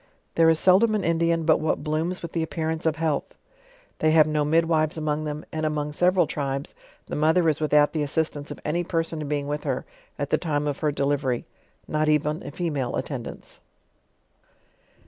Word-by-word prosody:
There 165 -1 +5
is 160 - +4
seldom 195 +6 +4
an 210 - -1
Indian 165 0 +1
but 160 -1 +4
what 155 - -1
blooms 160 +4 -2
with 170 - -5
the 165 - -1
appearance 160 0 -2
of 160 - +1
health. 160 -3 -2 0.6
They 155 - +3
have 155 -2 +7
no 150 -1 0
midwives 160 0 +2
among 155 0 -1
them^ 150 0 -4
and 155 0 -3
among 150 -1 -1
several 180 +3 +3
tribes 140 -1 -3 0.3
the - - -5
mother 160 +3 +3
is 155 -1 +1
without 150 -1 +4
the 155 - -1
assis 155 +2 0
tance 145 0 -8
of - - -7
any 170 +4 0
person 165 -3 -2
being 145 -1 -1
with 150 +1 -3
her - - -2 0.3
at - - -3
the - - +3
time 150 -3 -1
of 145 -2 -2
her 150 -2 +1
delive 145 0 0
ry, 125 -3 -1 0.4
not 155 0 +1
even 150 +2 +1
a - - -7
femnle 145 -8 -2
attendance. - - -6
155 Hz, 190 wpm, -25 LUFS, 150-165 Hz, 0.6 s, have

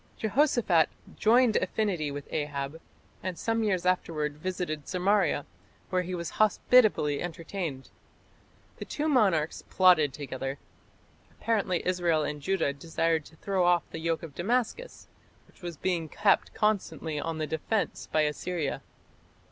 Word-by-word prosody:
Jehoshaphat 220 - +3 0.3
"joined 235 +1 +4
affinity 185 -5 -1
with 145 0 -6
Ahab", 145 +1 -3 0.4
and 185 -1 -4
some 225 +3 0
years 185 -4 0
afterwards 155 -5 0
visited 175 -4 -3
Samaria, 190 -4 +1 0.5
where 185 -1 +2
he 180 0 -4
was 170 -1 -4
hospitably 215 - +4
entertained. 165 -4 -5 0.9
The - - -6
two 305 +1 -2
monarchs 195 - +2
plotted 175 -6 +5
together. 135 -1 -5 0.7
Apparently 200 -6 -1
Israel 175 -4 +1
and 150 0 -4
Judah 190 -5 0
desired 165 +1 -1
to 160 - -15
throw 190 +2 0
off 175 -1 +4
the 165 - -5
yoke 165 0 -1
of 160 -4 -8
Damascus, 245 - -2 0.4
which - - -24
was 175 -3 -6
being 170 -3 -1
kept - - +2
constantly 195 -7 0
on 165 +1 -3
the 155 - -1
defence 160 +8 -2
by 155 - +3
Assyria. 155 +1 -2
175 Hz, 130 wpm, -28 LUFS, 155-200 Hz, 0.9 s, plotted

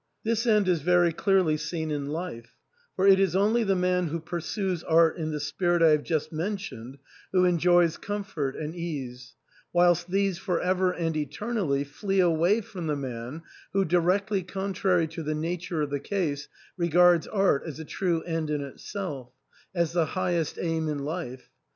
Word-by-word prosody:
This 230 +2 0
end 210 -3 +4
is 175 -4 +2
very 175 +1 +3
clearly 175 -2 +2
seen 160 +1 -3
in 145 -1 -2
life; 150 -7 -6 0.4
for 190 - +1
it 195 -1 +7
is 190 -3 +2
only 215 +4 +3
the 195 -2 +2
man 180 -1 +1
who 165 +2 -3
pursues 175 +2 -3
art 165 0 +4
in 160 -2 -3
the 150 -1 -3
spirit 165 +4 +1
I 165 - +7
have 150 -1 +4
just 155 -1 -2
mentioned 155 - -4 0.3
who 185 -1 +4
enjoys 175 -1 +3
comfort 195 -10 -3
and 155 0 -5
ease; 130 -8 -6 0.4
whilst 175 0 +3
these 195 -1 +1
for 180 -3 -1
ever 185 0 +1
and 165 -3 -2
eternally 155 - -1
flee 195 +7 -2
away 175 +5 +3
from 180 -5 -7
the 150 - 0
man 130 +2 -6 0.3
who, 195 0 +2
directly 185 +4 +1
contrary 190 -1 0
to 165 +1 -6
the 155 0 -2
nature 165 0 -2
of 145 - -4
the 145 - -1
case, 150 -4 -2 0.3
regards 175 0 +4
art 195 -9 +2
as 155 -1 -7
a 160 - -6
true 170 0 -1
end 165 -2 -2
in 150 -1 -1
itself 140 -2 -6 0.2
— - - -31
as 170 -2 +1
the 170 -2 +2
highest 175 -2 -1
aim 160 -2 -1
in 145 -2 -3
life. 145 -6 -5
170 Hz, 175 wpm, -27 LUFS, 155-185 Hz, 0.4 s, it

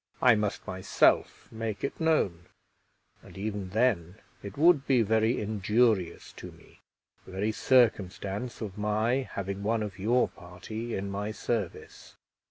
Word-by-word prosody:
I 125 - +6
must 105 -2 -2
myself 95 +1 +1
make 110 -2 -4
it 140 - -3
known, 100 - +1 0.7
and - - -14
even 100 -1 -4
then 100 -5 +1 0.3
it 100 0 -9
would 155 -2 +4
be 125 -4 +4
very 110 +2 +2
injurious 105 -2 0
to - - -8
me, - - -20 0.5
the - - -11
very 100 +3 0
circumstance 110 -2 +1
of 105 -2 -6
my 110 +5 0
having 100 0 -4
one 110 +2 0
of 100 -3 -7
your 120 +6 +2
party 105 +6 -7
in 100 +1 -4
my 100 +2 -3
service. 110 -2 -5
105 Hz, 140 wpm, -28 LUFS, 100-115 Hz, 0.7 s, I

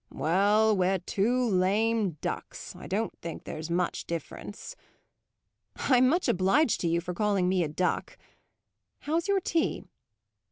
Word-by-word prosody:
"Well, 205 +6 +2
we're 190 0 +2
two 235 +7 0
lame 200 -1 +1
ducks; - - -5
I - - -10
don't 210 +5 -2
think 165 -1 -7
there's 155 +1 -6
much 175 +1 -1
difference." 170 - -6 1.0
"I'm 255 -1 +3
much 345 +5 +1
obliged 195 - +2
to 170 - 0
you 170 +1 +2
for 180 +1 -5
calling 200 -1 +1
me 185 -1 +2
a - - -1
duck. 175 +4 -2 0.8
How's 325 +4 -1
your 400 -1 +2
tea?" 330 -2 -1
195 Hz, 135 wpm, -28 LUFS, 180-230 Hz, 1.0 s, I'm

